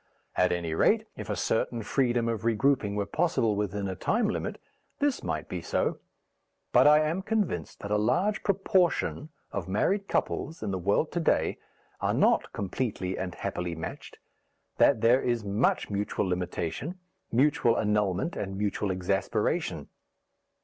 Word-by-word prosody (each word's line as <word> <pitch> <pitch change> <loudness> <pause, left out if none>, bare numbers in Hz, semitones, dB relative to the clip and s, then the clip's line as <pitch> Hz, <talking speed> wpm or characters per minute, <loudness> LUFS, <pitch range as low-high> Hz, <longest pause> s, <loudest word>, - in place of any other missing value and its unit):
At 90 0 +3
any 85 -2 -1
rate, - - +3
if - - -7
a - - 0
certain 115 0 -1
freedom 120 0 +1
of 115 -2 -2
regrouping 115 -2 +2
were 100 -1 0
possible 155 - +1
within 100 -1 -2
a 95 - -3
time 220 - +1
limit, 215 - -3 0.4
this 285 -2 0
might - - -3
be - - -4
so. - - -1 0.7
But - - +6
I 150 +1 +7
am 160 +5 0
convinced 195 - -2
that 100 - -5
a 105 - +3
large 175 - +1
proportion 185 -5 +1 0.2
of 95 -4 -4
married 195 - +1
couples 160 - -2
in 105 - -2
the 95 - -2
world 100 - +1
to 175 - -1
day 165 - +1 0.4
are - - 0
not - - +3
completely 100 -2 -3
and 90 -1 -4
happily 90 -1 -3
matched, 80 - -7 0.6
that 120 -6 +4
there 120 +3 +5
is 120 -3 -1
much 105 +2 +1
mutual 100 -1 -1
limitation, 90 - -3 0.3
mutual 120 -2 +3
annulment 105 - 0
and 95 -1 -4
mutual 105 0 -1
exasperation. 95 +1 -1
110 Hz, 150 wpm, -28 LUFS, 95-150 Hz, 0.7 s, I